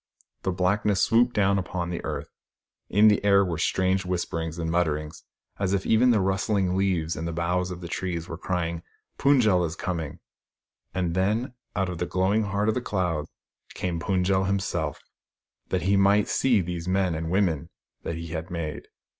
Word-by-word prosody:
The 95 - -1
blackness 95 +3 +1
swooped 120 +2 +3
down 100 -1 +3
upon 90 -1 -3
the 85 - -4
earth. - - -4 0.6
In 105 +3 +5
the 105 -1 +4
air 100 -1 +5
were 85 -3 -3
strange 95 +2 +1
whisperings 85 -2 -3
and 85 -1 -2
mutterings, 75 -2 -1 0.4
as 100 -1 0
if 95 - -2
even 115 +3 +4
the 115 -3 +4
rustling 95 0 +1
leaves 90 -4 0
and 80 - -4
the - - -2
boughs 90 +2 0
of 90 0 -7
the 85 - -6
trees 85 -1 -3
were 85 - -5
crying, 85 -1 -2 0.2
" - - -49
Fund 140 -2 +5
j 110 - +4
el 90 -1 +3
is 80 -1 -2
coming! 80 -5 -4 0.4
" - - -56
And 90 -2 0
then, 105 +8 0 0.2
out 95 -1 +1
of 90 -2 -5
the 90 - -1
glowing 95 +5 +1
heart 100 +1 -1
of 110 - +3
the 125 - -2
cloud 90 -9 -1 0.5
came 90 -2 -2
Fund 90 +2 0
j 95 - +2
el 95 0 +2
himself, 90 -6 -2 0.7
that - - 0
he 100 +2 +3
might 100 +1 +4
see 120 -6 +3
these 85 -1 -5
men 95 -1 +1
and 80 +1 -3
women 90 -6 +1 0.3
that 85 - -4
he 85 0 -6
had 80 +2 -5
made. 85 -4 -5
90 Hz, 195 wpm, -26 LUFS, 85-100 Hz, 0.7 s, In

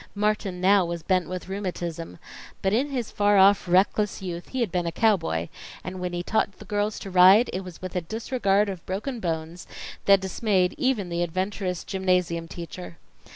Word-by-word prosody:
Martin 210 -3 -1
now 195 +1 +5
was 170 -1 -4
bent 185 0 +1
with 185 0 -5
rheumatism, 175 - -5 0.5
but 190 +1 +2
in 265 +6 +1
his 250 -5 -3
far 205 0 +3
off 195 0 +5
reckless 195 +3 +2
youth 175 -2 -6
he 260 - -3
had 225 -7 0
been 175 -1 -1
a - - -1
cowboy, 165 - +1 0.4
and 185 0 -6
when 180 0 -2
he 175 0 -3
taught 200 0 0
the - - -12
girls 205 +1 -1
to 195 - -7
ride, 185 +6 +7
it 185 - -3
was 180 -1 -11
with 185 - -6
a 180 - +1
disregard 210 +1 0
of 190 -4 -6
broken 220 +7 -3
bones 165 -1 -4 0.4
that 195 -1 +6
dismayed 190 -1 0
even 240 -9 0
the 170 0 -2
adventurous 185 +1 -2
gymnasium 180 -3 0
teacher. 170 0 -8
185 Hz, 185 wpm, -25 LUFS, 175-205 Hz, 0.5 s, ride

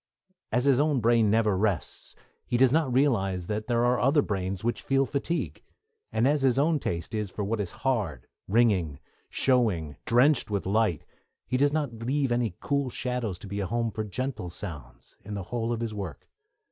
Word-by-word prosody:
As 125 +3 +1
his 140 -2 +4
own 145 -2 +2
brain 115 -1 +3
never 110 -2 +3
rests, 95 -3 -2 0.3
he 120 - +1
does 130 +1 +5
not 155 -4 +2
realise 100 -9 +1
that 105 +3 -3
there 120 -1 +2
are 125 0 +2
other 140 +3 +3
brains 95 -1 -3
which 120 +1 -1
feel 135 0 +2
fatigue; 145 +6 -2 0.5
and 115 +4 +2
as 145 0 +2
his 130 -2 +3
own 150 +2 +3
taste 85 - -4
is 105 -2 -2
for 105 - -4
what 105 +2 -1
is 95 - -3 0.2
hard, 100 - 0 0.2
ringing, 95 -9 +2 0.3
showy, 105 - +1
drenched 125 +3 +3
with 100 -2 -2
light, 100 -4 +1 0.4
he - - -2
does 140 +2 +3
not 145 -5 -1
leave 135 +1 0
any 120 -6 0
cool 140 -2 0
shadows 125 -6 -3
to 100 - -11
be 100 +1 -4
a 100 - -1
home 115 +3 -1
for 110 - -3
gentle 110 -2 -4
sounds, 70 -10 -9
in 105 +1 -6
the 100 - -4
whole 115 -1 -1
of 115 -1 -2
his 115 -2 -3
work. 95 -9 -6
115 Hz, 190 wpm, -27 LUFS, 100-130 Hz, 0.5 s, does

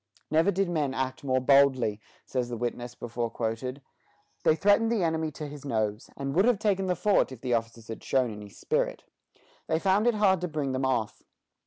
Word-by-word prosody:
"Never 160 +5 +4
did 195 0 +1
men 150 -6 -1
act 130 0 -3
more 130 -2 +1
boldly," 130 -5 +3 0.2
says 125 -2 -2
the 120 - -4
witness 120 +1 -4
before 120 0 -3
quoted; 125 +5 -4 0.6
"they 155 - +4
threatened 205 +6 +3
the 220 -6 +1
enemy 160 -1 0
to 155 - -6
his 145 -1 -9
nose, 110 -5 -2
and 135 0 -3
would 190 +6 +4
have 245 -3 +4
taken 195 -2 0
the 180 - +1
fort 205 -8 +2
if 125 -3 -10
the 125 -2 -1
officers 115 0 -2
had 115 - -7
shown 130 -3 +1
any 105 -1 -9
spirit. - - -2 0.6
They 160 - +1
found 195 +5 +2
it 240 - +3
hard 190 -4 +3
to 180 - -1
bring 150 -4 -2
them 130 +1 -1
off. 115 -5 -1
135 Hz, 200 wpm, -28 LUFS, 120-175 Hz, 0.6 s, Never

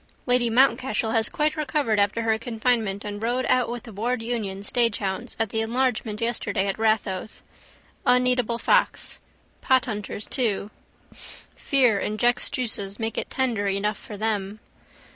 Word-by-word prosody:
Lady 245 -1 +2
Mountcashel 230 -2 +2
has 225 -1 +3
quite 300 0 0
recovered 285 -7 0
after 205 +3 +1
her 220 -1 +1
confinement 225 -4 -1
and 205 0 -5
rode 245 +3 0
out 250 -2 +2
with 240 -1 -5
the 225 - -11
Ward 225 +3 -1
Union 210 -5 -3
staghounds 205 -4 0
at 225 -2 +1
the 220 +2 -1
enlargement 230 -2 -1
yesterday 225 -4 -1
at 195 +1 -2
Rathoath. 215 -3 -1 0.6
Uneatable 250 -2 +3
fox. - - +1 0.4
Pothunters 215 -5 0
too. 215 -5 0 0.4
Fear 250 -8 0
injects 240 +5 +1
juices 220 -7 -2
make 225 -1 -3
it - - -3
tender 235 -7 0
enough 200 +2 -1
for 210 - -9
them. 210 -1 -2
225 Hz, 140 wpm, -25 LUFS, 210-245 Hz, 0.6 s, has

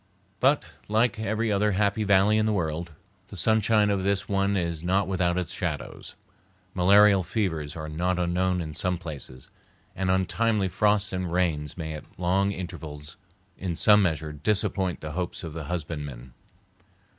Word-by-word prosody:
But, 140 +3 +3 0.2
like 110 +2 +2
every 110 +1 -1
other 105 0 +2
happy 100 +2 +1
valley 100 +1 +4
in 110 - +2
the 110 - +1
world, 85 -2 -2 0.4
the 100 - -10
sunshine 110 +2 +3
of 100 -1 0
this 95 0 0
one 100 0 +1
is 85 -3 -2
not 95 +2 +1
without 90 -2 0
its 90 -3 -2
shadows. - - -5 0.6
Malarial 100 +2 +6
fevers 85 -7 -2
are 80 -1 -5
not 90 +4 -1
unknown 90 +1 0
in 80 -2 -6
some 90 +3 -1
places, 70 -7 -9 0.4
and 95 -1 -1
untimely 95 +2 +1
frosts 105 +2 +1
and 90 -2 -2
rains 80 -5 -1
may 80 -2 -4
at 75 - -11
long 95 +3 +2
intervals 80 -5 -7 0.4
in 90 -3 -3
some 105 +5 +5
measure 80 -4 -1
disappoint 95 +2 -1
the 75 - -5
hopes 90 +2 -4
of 80 -3 -6
the 80 -2 -6
husbandman. 75 -6 -5
90 Hz, 155 wpm, -26 LUFS, 80-100 Hz, 0.6 s, Malarial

